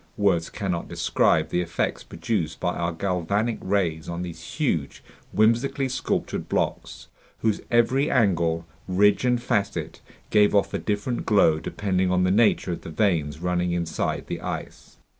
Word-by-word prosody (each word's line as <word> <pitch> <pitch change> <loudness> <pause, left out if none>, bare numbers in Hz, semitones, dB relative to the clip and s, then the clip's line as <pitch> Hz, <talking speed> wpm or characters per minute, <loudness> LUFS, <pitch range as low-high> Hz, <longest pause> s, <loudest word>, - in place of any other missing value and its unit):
Words 95 -5 +2
cannot 90 -5 -3
describe - - +1
the 90 - 0
effects 85 -1 -2
produced 85 -2 -3
by 90 0 0
our 85 0 -1
galvanic 100 +6 -1
rays 90 -5 -1
on 85 +1 -3
these 85 -2 -8
huge, - - -1 0.3
whimsically 120 +5 +2
sculpted 130 - -2
blocks, - - -2 0.3
whose 110 -2 +1
every 120 +4 +3
angle, 85 -9 +2 0.2
ridge, 100 +5 +3
and 125 -1 +2
facet 105 -4 -2 0.3
gave 105 -1 +4
off 100 -1 +2
a - - -1
different 105 +4 -2
glow 80 -7 +4
depending 95 +1 -1
on 90 0 +2
the 90 - +2
nature 105 -3 +3
of 85 - -4
the - - -8
veins 80 -4 0
running 90 0 0
inside 85 -2 -2
the - - -5
ice. - - -7
95 Hz, 150 wpm, -25 LUFS, 85-105 Hz, 0.3 s, gave